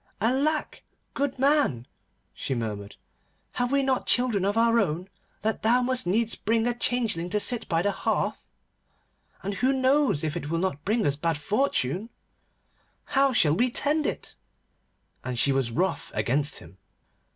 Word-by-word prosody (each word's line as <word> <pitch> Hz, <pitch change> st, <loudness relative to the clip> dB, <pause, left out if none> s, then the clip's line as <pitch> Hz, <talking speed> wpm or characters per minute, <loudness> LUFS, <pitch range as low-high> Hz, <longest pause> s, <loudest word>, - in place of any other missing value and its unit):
'Alack, 275 Hz, +8 st, 0 dB, 0.3 s
goodman!' 275 Hz, -, +1 dB, 0.5 s
she 135 Hz, -, -3 dB
murmured, 105 Hz, -4 st, -5 dB, 0.6 s
'have 245 Hz, 0 st, -1 dB
we 280 Hz, 0 st, +2 dB
not 265 Hz, -1 st, 0 dB
children 245 Hz, -6 st, +2 dB
of 200 Hz, +3 st, 0 dB
our 230 Hz, 0 st, +4 dB
own, 180 Hz, -2 st, -1 dB, 0.3 s
that 220 Hz, 0 st, -1 dB
thou 235 Hz, +3 st, +4 dB
must 255 Hz, -5 st, +1 dB
needs 225 Hz, +5 st, +1 dB
bring 225 Hz, +1 st, 0 dB
a 245 Hz, -, +1 dB
changeling 230 Hz, -8 st, -1 dB
to 210 Hz, -, +1 dB
sit 240 Hz, +2 st, 0 dB
by 165 Hz, -1 st, +1 dB
the 205 Hz, -, +2 dB
hearth? -, -, -2 dB, 1.0 s
And 200 Hz, -, -2 dB
who 250 Hz, +7 st, +1 dB
knows 265 Hz, -, +2 dB
if 155 Hz, -2 st, -2 dB
it 145 Hz, -, -4 dB
will 165 Hz, -, 0 dB
not 165 Hz, -5 st, -2 dB
bring 215 Hz, +2 st, +1 dB
us 140 Hz, -, +2 dB
bad 165 Hz, +1 st, -1 dB
fortune? 180 Hz, -, 0 dB
And 225 Hz, +3 st, -11 dB, 0.9 s
how 275 Hz, 0 st, +2 dB
shall 155 Hz, -12 st, +3 dB
we 245 Hz, +7 st, +2 dB
tend 295 Hz, +5 st, 0 dB
it?' -, -, -5 dB, 0.9 s
And 125 Hz, -1 st, -4 dB
she 140 Hz, -, +2 dB
was 135 Hz, -3 st, +1 dB
wroth 180 Hz, +11 st, -1 dB
against 135 Hz, +7 st, 0 dB
him. 90 Hz, +3 st, -14 dB
210 Hz, 160 wpm, -26 LUFS, 150-250 Hz, 1.0 s, our